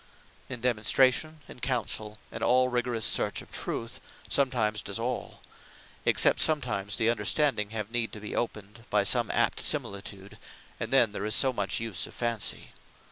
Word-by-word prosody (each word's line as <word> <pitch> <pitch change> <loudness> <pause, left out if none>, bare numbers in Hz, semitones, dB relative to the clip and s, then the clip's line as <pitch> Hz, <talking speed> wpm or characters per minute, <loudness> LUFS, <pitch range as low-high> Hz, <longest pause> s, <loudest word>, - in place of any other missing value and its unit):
In 125 -3 -6
Demonstration, 130 +6 +2
in - - -12
Councell, 110 -4 -2
and - - -7
all 125 +1 +3
rigourous 120 -2 0
search - - +2
of - - -19
Truth, 115 +1 -4 0.3
Judgement 115 -6 +1
does 100 - -3
all; 120 +2 -4 0.7
except - - +4
sometimes 110 -10 +1
the 115 - +1
understanding 120 -4 +1
have 110 -1 -5
need 120 -1 -1
to 105 - -6
be 105 - -6
opened 110 -1 -4
by 105 -1 +3
some 120 +2 +3
apt - - +1
similitude; 100 0 -1 0.4
and - - -4
then 120 -5 +4
there 100 - -5
is 110 +2 +1
so 130 -2 +3
much 100 -4 -1
use 110 -6 -3
of - - -14
Fancy. 115 -3 -2
115 Hz, 160 wpm, -28 LUFS, 105-125 Hz, 0.7 s, except